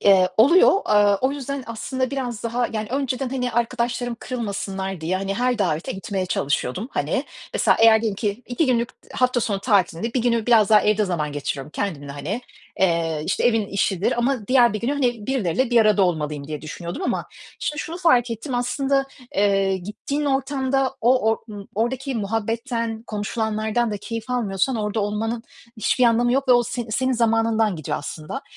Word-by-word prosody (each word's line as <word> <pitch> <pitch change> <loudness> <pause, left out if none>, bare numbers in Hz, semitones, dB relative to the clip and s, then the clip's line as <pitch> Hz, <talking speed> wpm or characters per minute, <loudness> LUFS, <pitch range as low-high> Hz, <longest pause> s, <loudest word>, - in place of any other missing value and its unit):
Eee, 190 -2 +5
oluyor. 285 +12 +6 0.2
Eee, 205 -1 +5
o 260 +1 +1
yüzden 275 -1 -5
aslında 255 +3 -3
biraz 250 -5 -4
daha 235 +1 0
yani 215 -1 -3
önceden, 265 -1 -1
hani, 250 -1 -2
arkadaşlarım 235 +1 -1
kırılmasınlar 195 -6 -4
diye, 170 +4 -1
hani, 195 +1 -2
her 245 +1 0
davete 170 -5 -1
gitmeye 190 -1 -3
çalışıyordum. 145 - -1
Hani, - - -1 0.3
mesela - - +3
eğer 225 -1 +7
diyelim 215 -3 -1
ki 210 +2 -2
2 250 +6 0
günlük 240 -2 +1 0.2
hafta 250 -1 +1
sonu 205 -3 -1
tatilinde, 200 0 +1
bir 250 - +1
günü 235 -2 +1
biraz 225 -3 +5
daha 210 -1 +7
evde 210 0 +2
zaman 160 -6 -2
geçiriyorum 145 0 -4
kendimle, 150 -7 -4
hani, 150 - -4 0.4
eee, 165 -4 +1
işte, - - 0
evin 225 -3 +3
işidir 195 -1 0
Ama 240 -3 0
diğer 245 -2 +5
bir 215 - -3
günü, 245 +4 0
hani 245 -7 -1
birileriyle 255 -1 0
bir 240 -1 +5
arada 215 -2 +4
olmalıyım 150 -5 -1
diye 150 -1 -5
düşünüyordum 170 - -6
ama - - -1 0.3
şimdi 300 - -3
şunu 330 - -5
fark 250 -9 +3
ettim: 230 +4 -4
Aslında, 270 +3 0 0.3
eee, 195 -1 +2
gittiğin 210 +10 -4
ortamda 270 -1 0
o 250 +2 +4
or 225 - +1
ımm, 205 -1 -9
oradaki 260 +5 -1
muhabbetten, 225 +2 -2
konuşulanlardan 220 +2 -1
da 210 - -2
keyif 230 +3 -6
almıyorsan 230 0 0
orada 210 0 -1
olmanın 220 +3 -2 0.3
hiçbir 245 +3 +2
anlamı 240 +1 +3
yok 270 +1 0
ve - - +8
o 245 0 +5
s 240 +1 -4
senin 260 +4 +1
zamanından 225 -3 +2
gidiyor 155 - -3
aslında. 155 - -6
225 Hz, 175 wpm, -22 LUFS, 195-250 Hz, 0.4 s, ve